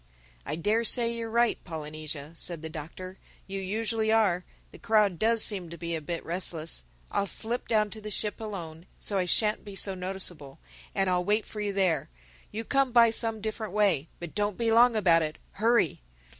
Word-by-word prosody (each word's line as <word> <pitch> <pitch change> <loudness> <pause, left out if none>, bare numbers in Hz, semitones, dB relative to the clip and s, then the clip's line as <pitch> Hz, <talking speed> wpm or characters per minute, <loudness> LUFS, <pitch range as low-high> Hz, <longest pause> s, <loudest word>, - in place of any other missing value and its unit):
"I 150 - -1
dare 210 +8 +1
say 235 0 +3
you're 230 -1 -4
right, 235 +1 +2
Polynesia," 155 -2 -6
said 170 -1 -3
the 160 - -5
Doctor—"You 185 +5 -8
usually 220 +3 0
are. 200 -5 +3 0.3
The - - -13
crowd 210 -6 +3
does 225 0 +3
seem 190 -5 0
to 170 - -8
be 170 -1 -4
a 160 - -2
bit 165 +3 -4
restless. 165 - -1 0.3
I'll 200 - 0
slip 230 +6 0
down 215 -2 +2
to 220 - -8
the 210 - -6
ship 210 +1 -2
alone—so 185 -1 -4
I 180 - +1
shan't 210 +4 +2
be 205 -2 -9
so 195 0 +1
noticeable; 180 -6 -5 0.4
and 195 - +2
I'll 180 -1 +2
wait 210 +3 +1
for 210 - -6
you 205 -1 -1
there. 190 -4 +1 0.4
You 225 +2 -4
come 275 +2 +2
by 235 -1 +6
some 225 -1 +1
different 220 -2 -4
way. 195 -8 +2
But 175 -2 -7
don't 205 -2 -1
be 230 -1 +1
long 235 +1 +6
about 175 -6 +4
it. 155 -1 -3
Hurry!" 225 - +2
200 Hz, 185 wpm, -28 LUFS, 170-220 Hz, 0.4 s, by